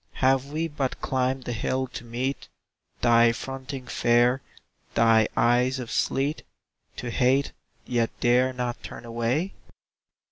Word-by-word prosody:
Have 135 Hz, 0 st, +2 dB
we 155 Hz, +3 st, -2 dB
but 145 Hz, -4 st, -3 dB
climbed 130 Hz, 0 st, -1 dB
the 120 Hz, -, -3 dB
hill 130 Hz, +3 st, -1 dB
to 120 Hz, -, -8 dB
meet 125 Hz, +4 st, -3 dB, 0.5 s
Thy 115 Hz, -1 st, +5 dB
fronting 135 Hz, +2 st, -6 dB
fare, 120 Hz, +2 st, +3 dB, 0.5 s
thy 115 Hz, -1 st, +5 dB
eyes 125 Hz, +2 st, +3 dB
of 125 Hz, -3 st, -6 dB
sleet? 140 Hz, +3 st, 0 dB, 0.5 s
To 120 Hz, -, -5 dB
hate, 130 Hz, +3 st, +2 dB, 0.3 s
yet 120 Hz, -2 st, +1 dB
dare 125 Hz, +2 st, +3 dB
not 125 Hz, -1 st, -4 dB
turn -, -, -9 dB
away? 120 Hz, +10 st, -1 dB
125 Hz, 130 wpm, -26 LUFS, 120-135 Hz, 0.5 s, Thy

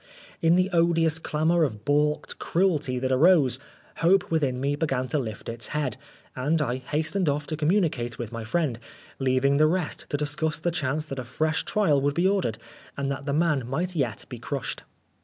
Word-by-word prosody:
In 165 Hz, +1 st, +4 dB
the 185 Hz, +2 st, +2 dB
odious 165 Hz, -2 st, +3 dB
clamour 160 Hz, +2 st, +1 dB
of 110 Hz, -7 st, -3 dB
baulked 150 Hz, +1 st, +1 dB
cruelty 160 Hz, -8 st, +1 dB
that 130 Hz, +1 st, -1 dB
arose, 135 Hz, -3 st, +4 dB, 0.4 s
hope 195 Hz, +3 st, +3 dB
within 140 Hz, -6 st, +1 dB
me 140 Hz, +2 st, 0 dB
began 135 Hz, -4 st, -1 dB
to 155 Hz, -, +1 dB
lift 110 Hz, -6 st, -6 dB
its 115 Hz, -1 st, -3 dB
head, 135 Hz, -7 st, -1 dB, 0.4 s
and 150 Hz, +6 st, +1 dB
I 130 Hz, -4 st, 0 dB
hastened 155 Hz, +7 st, -1 dB
off 145 Hz, +1 st, -1 dB
to 155 Hz, -, -3 dB
communicate 150 Hz, -, 0 dB
with 120 Hz, -2 st, -5 dB
my 115 Hz, -1 st, -5 dB
friend, 125 Hz, 0 st, -1 dB, 0.4 s
leaving 135 Hz, +1 st, +2 dB
the 155 Hz, +1 st, +5 dB
rest 175 Hz, 0 st, -2 dB
to 145 Hz, -, 0 dB
discuss 150 Hz, +2 st, 0 dB
the 170 Hz, +2 st, -1 dB
chance 150 Hz, -1 st, -1 dB
that 135 Hz, -3 st, -5 dB
a -, -, -3 dB
fresh 155 Hz, +6 st, -1 dB
trial 155 Hz, -10 st, +2 dB
would 145 Hz, +1 st, 0 dB
be 175 Hz, +2 st, +3 dB
ordered, 190 Hz, -, 0 dB, 0.4 s
and 140 Hz, 0 st, -1 dB
that 140 Hz, +1 st, -5 dB
the 140 Hz, -, 0 dB
man 150 Hz, -5 st, +1 dB
might 175 Hz, +7 st, -2 dB
yet 125 Hz, -9 st, -1 dB
be -, -, -8 dB
crushed. -, -, -3 dB
150 Hz, 190 wpm, -26 LUFS, 130-165 Hz, 0.4 s, the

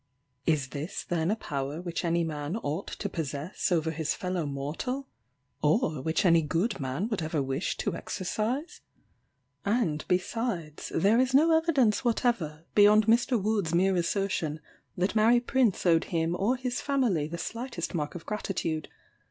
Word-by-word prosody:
Is 150 Hz, -5 st, +2 dB
this 150 Hz, +5 st, -5 dB
then 165 Hz, -1 st, -1 dB
a 215 Hz, -, +2 dB
power 145 Hz, -6 st, -4 dB
which 175 Hz, 0 st, -4 dB
any 170 Hz, 0 st, +1 dB
man 150 Hz, +3 st, -3 dB
ought 160 Hz, -2 st, -3 dB
to 205 Hz, -, -4 dB
possess 160 Hz, +1 st, -3 dB
over 160 Hz, -2 st, +2 dB
his 160 Hz, -1 st, -1 dB
fellow 180 Hz, -4 st, -2 dB
mortal? 155 Hz, -, -3 dB, 0.5 s
or 155 Hz, -, +2 dB
which 160 Hz, +7 st, 0 dB
any 170 Hz, -2 st, +6 dB
good 170 Hz, +8 st, -1 dB
man 135 Hz, +9 st, -2 dB
would 215 Hz, -6 st, -2 dB
ever 155 Hz, -1 st, -1 dB
wish 135 Hz, +4 st, -1 dB
to -, -, -2 dB
exercise? 225 Hz, -, -3 dB, 0.8 s
And, 200 Hz, -8 st, 0 dB
besides, 180 Hz, -4 st, -2 dB
there 205 Hz, +7 st, +4 dB
is 260 Hz, +1 st, +2 dB
no 320 Hz, +3 st, +6 dB
evidence 285 Hz, -10 st, +3 dB
whatever, 210 Hz, -, 0 dB
beyond 210 Hz, +1 st, +6 dB
Mr. 235 Hz, +2 st, +3 dB
Wood's 200 Hz, -5 st, 0 dB
mere 190 Hz, +2 st, +3 dB
assertion, 175 Hz, -3 st, -1 dB, 0.4 s
that 185 Hz, +4 st, 0 dB
Mary 225 Hz, +3 st, +5 dB
Prince 240 Hz, -5 st, +1 dB
owed 165 Hz, -2 st, +4 dB
him 165 Hz, 0 st, 0 dB
or 205 Hz, +8 st, +1 dB
his 250 Hz, -1 st, -3 dB
family 240 Hz, -, +1 dB
the 170 Hz, +2 st, -5 dB
slightest 230 Hz, +1 st, -4 dB
mark 150 Hz, -2 st, -2 dB
of 170 Hz, -, -8 dB
gratitude. 180 Hz, -7 st, -2 dB
180 Hz, 155 wpm, -28 LUFS, 160-225 Hz, 0.8 s, any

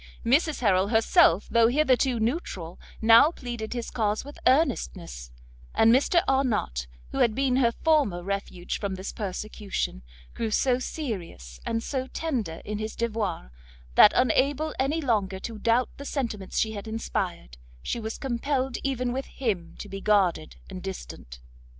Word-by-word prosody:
Mrs 290 Hz, +5 st, +2 dB
Harrel 195 Hz, -4 st, +3 dB
herself, 210 Hz, -4 st, +4 dB
though 230 Hz, -1 st, +4 dB
hitherto 260 Hz, -2 st, +2 dB
neutral, 220 Hz, -, -3 dB, 0.2 s
now 230 Hz, +6 st, +8 dB
pleaded 240 Hz, -8 st, -6 dB
his 240 Hz, -2 st, -4 dB
cause 215 Hz, -1 st, -1 dB
with 285 Hz, -, -10 dB
earnestness; 65 Hz, -, 0 dB, 0.5 s
and 225 Hz, +1 st, +6 dB
Mr 335 Hz, +7 st, +3 dB
Arnott, 230 Hz, -, 0 dB, 0.2 s
who -, -, -3 dB
had 220 Hz, -2 st, +3 dB
been 265 Hz, -2 st, +1 dB
her 235 Hz, -3 st, +3 dB
former 255 Hz, -, +1 dB
refuge 195 Hz, -2 st, -4 dB
from 200 Hz, -2 st, -3 dB
this 190 Hz, +1 st, -5 dB
persecution, 205 Hz, -, -4 dB, 0.3 s
grew 225 Hz, -, -2 dB
so 250 Hz, +3 st, +2 dB
serious 180 Hz, -, -6 dB
and 225 Hz, 0 st, -1 dB
so 260 Hz, -2 st, -3 dB
tender 245 Hz, -, -3 dB
in 210 Hz, 0 st, -4 dB
his 215 Hz, 0 st, -4 dB
devoirs, 215 Hz, -, -2 dB, 0.4 s
that 205 Hz, -, +8 dB
unable 275 Hz, +5 st, +2 dB
any 290 Hz, +5 st, +1 dB
longer 205 Hz, -8 st, 0 dB
to 225 Hz, -2 st, -6 dB
doubt 235 Hz, +3 st, +2 dB
the 280 Hz, -, -7 dB
sentiments 225 Hz, -10 st, -3 dB
she 220 Hz, -, +2 dB
had 205 Hz, 0 st, -7 dB
inspired, 180 Hz, -, -4 dB, 0.3 s
she 240 Hz, -, -2 dB
was 220 Hz, 0 st, -5 dB
compelled 265 Hz, 0 st, -1 dB
even 255 Hz, -3 st, -1 dB
with 265 Hz, +1 st, -3 dB
him 195 Hz, -10 st, -3 dB
to -, -, -7 dB
be 195 Hz, 0 st, -7 dB
guarded 190 Hz, -7 st, +2 dB
and 185 Hz, -1 st, -8 dB
distant. -, -, -8 dB
225 Hz, 150 wpm, -26 LUFS, 195-260 Hz, 0.5 s, now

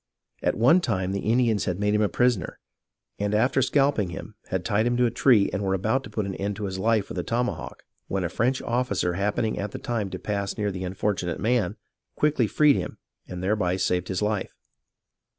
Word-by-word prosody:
At -, -, 0 dB
one 135 Hz, +11 st, +5 dB
time 95 Hz, -, -1 dB
the 100 Hz, -, -1 dB
Indians 115 Hz, -3 st, +2 dB
had 90 Hz, 0 st, -2 dB
made 105 Hz, 0 st, +1 dB
him 105 Hz, -, +2 dB
a 105 Hz, -, +2 dB
prisoner, 120 Hz, -8 st, +1 dB, 0.6 s
and 105 Hz, +1 st, 0 dB
after 130 Hz, +5 st, +3 dB
scalping 135 Hz, -7 st, +2 dB
him 80 Hz, -, -8 dB
had 95 Hz, -1 st, -2 dB
tied 110 Hz, +1 st, +2 dB
him 120 Hz, 0 st, +1 dB
to 125 Hz, -, +4 dB
a 115 Hz, -, +1 dB
tree 120 Hz, -4 st, +4 dB
and 95 Hz, -, -1 dB
were 95 Hz, -1 st, +1 dB
about 110 Hz, +8 st, 0 dB
to -, -, -9 dB
put 105 Hz, -1 st, -2 dB
an 95 Hz, -, -3 dB
end 100 Hz, +1 st, -2 dB
to 105 Hz, -, -6 dB
his 95 Hz, -1 st, -3 dB
life 110 Hz, 0 st, +2 dB
with 90 Hz, -, -4 dB
a -, -, -1 dB
tomahawk 120 Hz, +4 st, -3 dB, 0.2 s
when 95 Hz, -1 st, -1 dB
a -, -, 0 dB
French 125 Hz, +8 st, 0 dB
officer 120 Hz, -7 st, 0 dB
happening 105 Hz, +4 st, -1 dB
at 100 Hz, 0 st, -4 dB
the -, -, -4 dB
time 115 Hz, -5 st, -2 dB
to 95 Hz, -, -5 dB
pass 100 Hz, 0 st, -3 dB
near 105 Hz, -2 st, 0 dB
the 95 Hz, -1 st, -5 dB
unfortunate 90 Hz, -2 st, -2 dB
man, 110 Hz, -2 st, +1 dB, 0.4 s
quickly 145 Hz, -6 st, +2 dB
freed 150 Hz, +4 st, +4 dB
him -, -, -4 dB, 0.3 s
and 90 Hz, 0 st, -6 dB
thereby 95 Hz, -2 st, +1 dB
saved 90 Hz, -1 st, 0 dB
his 95 Hz, +2 st, -2 dB
life. 105 Hz, -2 st, -2 dB
105 Hz, 215 wpm, -25 LUFS, 95-120 Hz, 0.6 s, one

